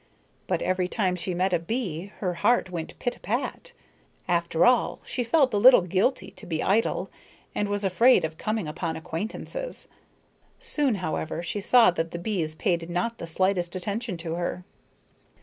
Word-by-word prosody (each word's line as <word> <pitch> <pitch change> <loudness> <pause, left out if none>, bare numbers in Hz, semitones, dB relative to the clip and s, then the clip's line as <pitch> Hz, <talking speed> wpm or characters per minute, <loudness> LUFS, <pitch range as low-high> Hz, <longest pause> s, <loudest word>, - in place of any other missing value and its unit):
But - - 0
every 185 -1 0
time 185 -2 0
she 180 +1 -3
met 185 +1 +1
a 175 - +3
bee, 185 -2 -3
her 180 -3 0
heart 185 +2 +2
went 165 -2 -5
pit 245 - -3
a - - -24
pat. - - -3 0.6
After 170 -2 +2
all 245 -1 +3
she 250 - -2
felt 265 0 +3
a - - +2
little 245 -2 +8
guilty 195 +9 0
to - - -10
be 160 -2 -2
idle, 215 +4 +1 0.4
and 205 - -1
was 205 0 -1
afraid 195 0 +4
of 160 0 -5
coming 215 -5 -2
upon 160 +2 -3
acquaintances. 215 - -5 0.7
Soon, 295 - +1
however, 160 +1 -3
she 200 +4 -3
saw 230 0 +6
that 165 -1 -2
the 170 - -5
bees 170 -5 -2
paid 170 -2 -1
not 225 +7 -2
the 170 - -6
slightest 180 +1 0
attention 205 +2 -3
to 165 -1 -4
her. 175 +1 -3
185 Hz, 170 wpm, -26 LUFS, 170-225 Hz, 0.7 s, little